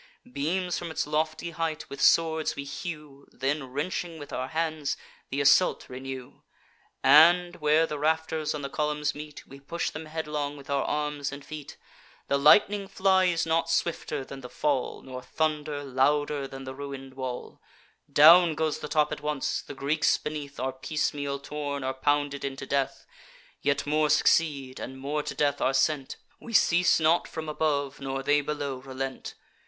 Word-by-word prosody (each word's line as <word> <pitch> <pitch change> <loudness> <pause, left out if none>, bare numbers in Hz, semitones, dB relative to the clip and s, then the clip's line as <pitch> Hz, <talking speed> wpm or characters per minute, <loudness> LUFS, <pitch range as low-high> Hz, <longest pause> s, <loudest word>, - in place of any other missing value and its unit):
Beams 175 +6 -1
from 175 - -5
its 160 0 -2
lofty 155 +2 -1
height 165 -1 -3
with 140 0 -8
swords 160 +1 +3
we 140 - -5
hew, 150 -1 -7
Then, 135 +2 -2
wrenching 165 +4 -3
with 145 -2 -9
our 130 - -2
hands, 160 -3 -2 0.3
th' - - -2
assault 150 +6 +4
renew; 130 0 -8 0.6
And, 175 +3 +6
where 155 +1 +3
the 150 -2 -5
rafters 160 0 0
on 145 - -5
the 140 - -3
columns 150 +2 -1
meet, 150 0 -9
We 135 - -13
push 170 +5 -3
them 155 +1 -7
headlong 150 -2 -3
with 140 0 -9
our 140 -1 +1
arms 150 -2 -2
and 140 0 -9
feet. 150 -2 -8 0.5
The 140 - +2
lightning 200 +7 +5
flies 190 -3 +2
not 165 0 +1
swifter 165 -5 -1
than 135 0 -9
the 125 - -9
fall, 140 -2 -1
Nor 130 -1 -7
thunder 150 -1 -2
louder 140 +1 +1
than 135 0 -9
the 130 0 -6
ruin'd 135 -1 -8
wall: 130 -2 -6 0.5
Down 165 +2 +8
goes 160 -1 -1
the - - -5
top 150 -1 +2
at - - -4
once; 150 -3 -1
the - - -10
Greeks 150 +3 +2
beneath 150 -2 -6
Are 130 +1 -1
piecemeal 145 0 -2
torn, 145 0 -4
or 130 0 -1
pounded 145 +1 0
into 135 0 -4
death. 140 0 -1 0.6
Yet 140 0 0
more 150 +1 +2
succeed, 140 -3 +2
and 130 +1 -7
more 145 +3 -2
to - - -6
death 145 -1 +1
are 135 - +2
sent; 135 0 +1 0.2
We 230 - -10
cease 180 -4 +4
not 165 +2 +3
from 160 -1 -6
above, 145 -2 -1
nor 135 0 -3
they 145 +1 +3
below 145 -2 -3
relent. 135 0 -6
150 Hz, 170 wpm, -27 LUFS, 140-155 Hz, 0.6 s, Down